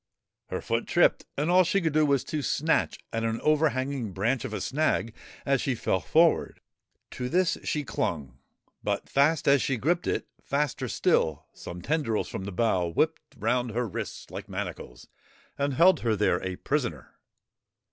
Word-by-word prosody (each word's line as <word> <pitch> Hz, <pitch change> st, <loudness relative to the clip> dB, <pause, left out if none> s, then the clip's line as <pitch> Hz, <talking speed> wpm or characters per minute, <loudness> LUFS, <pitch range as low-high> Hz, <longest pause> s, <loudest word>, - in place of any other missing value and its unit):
Her -, -, -4 dB
foot -, -, -1 dB
tripped -, -, +3 dB
and 150 Hz, +4 st, +1 dB
all 185 Hz, +1 st, +6 dB
she 195 Hz, +3 st, +1 dB
could 160 Hz, -5 st, -1 dB
do 155 Hz, 0 st, +4 dB
was 140 Hz, -2 st, +2 dB
to 155 Hz, -, -3 dB
snatch 155 Hz, +3 st, +1 dB, 0.2 s
at 115 Hz, 0 st, -1 dB
an 115 Hz, 0 st, -1 dB
overhanging 140 Hz, -7 st, +1 dB
branch 115 Hz, +7 st, 0 dB
of -, -, -5 dB
a 105 Hz, -, -3 dB
snag 130 Hz, -2 st, 0 dB, 0.3 s
as 135 Hz, -2 st, +2 dB
she 130 Hz, -, 0 dB
fell 95 Hz, -4 st, 0 dB
forward. 165 Hz, -, +2 dB, 0.5 s
To 125 Hz, 0 st, -4 dB
this 180 Hz, +2 st, +2 dB
she 150 Hz, -, -1 dB
clung, 85 Hz, -, -3 dB, 0.4 s
but, -, -, -2 dB
fast 150 Hz, +3 st, +2 dB
as 140 Hz, -1 st, +5 dB
she 135 Hz, -, 0 dB
gripped 170 Hz, +9 st, 0 dB
it, -, -, -1 dB, 0.2 s
faster 145 Hz, 0 st, -1 dB
still 80 Hz, -3 st, +1 dB
some 85 Hz, 0 st, -9 dB
tendrils 145 Hz, -8 st, 0 dB
from 95 Hz, -, -5 dB
the 100 Hz, -, -5 dB
bough 95 Hz, -3 st, +1 dB
whipped 155 Hz, -, 0 dB, 0.2 s
round 120 Hz, +2 st, 0 dB
her 120 Hz, 0 st, 0 dB
wrists 95 Hz, -, -6 dB
like -, -, -7 dB
manacles -, -, -6 dB, 0.5 s
and 140 Hz, -1 st, -1 dB
held 180 Hz, +5 st, +6 dB
her 115 Hz, -2 st, +1 dB
there 105 Hz, 0 st, +1 dB
a 95 Hz, -1 st, -3 dB
prisoner. -, -, -3 dB
130 Hz, 170 wpm, -27 LUFS, 110-155 Hz, 0.5 s, all